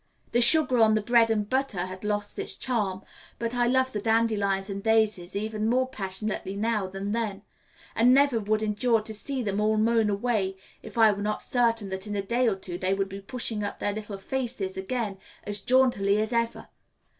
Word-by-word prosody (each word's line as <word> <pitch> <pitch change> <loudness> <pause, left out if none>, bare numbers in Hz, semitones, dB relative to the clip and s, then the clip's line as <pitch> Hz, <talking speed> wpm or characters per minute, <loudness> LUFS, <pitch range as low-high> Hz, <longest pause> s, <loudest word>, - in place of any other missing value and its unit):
The 240 - +2
sugar 255 0 +6
on 220 -1 +5
the 215 - +1
bread 235 0 +4
and 210 -2 0
butter 260 -8 -1
has 185 +1 -9
lost 205 0 -2
its - - -1
charm, 205 -7 -2 0.3
but 230 0 -3
I 240 -1 +2
love 260 +1 +2
the 210 - -3
dandelions 210 -3 +1
and 200 -1 -5
daisies 215 -4 +1
even 215 +1 -2
more 255 +2 +2
passionately 195 -3 -4
now 215 -1 -1
than 195 +2 -5
then, 210 -3 -2 0.5
and 240 +2 +5
never 275 -3 +4
would 215 +1 0
endure 220 +2 +1
to 220 +1 -3
see 260 +4 -2
them 205 -1 -1
all 215 0 +2
mown 225 0 +2
away 200 -2 -1 0.2
if 220 0 -11
I 220 -2 +6
were 205 0 -4
not 210 +1 -2
certain 230 -4 +1
that 190 +2 -3
in 205 - -4
a 200 - -1
day 240 +5 +1
or 215 - +2
two 180 -2 -5
they 190 +1 0
would 195 0 -2
be 195 +1 -8
pushing 220 0 -3
up 205 - -4
their 205 - -2
little 210 -1 -6
faces 230 -3 -3
again 200 0 -3 0.2
as 205 0 -4
jauntily 210 -4 +3
as 220 +2 -1
ever. 230 0 -2
215 Hz, 200 wpm, -26 LUFS, 200-235 Hz, 0.5 s, sugar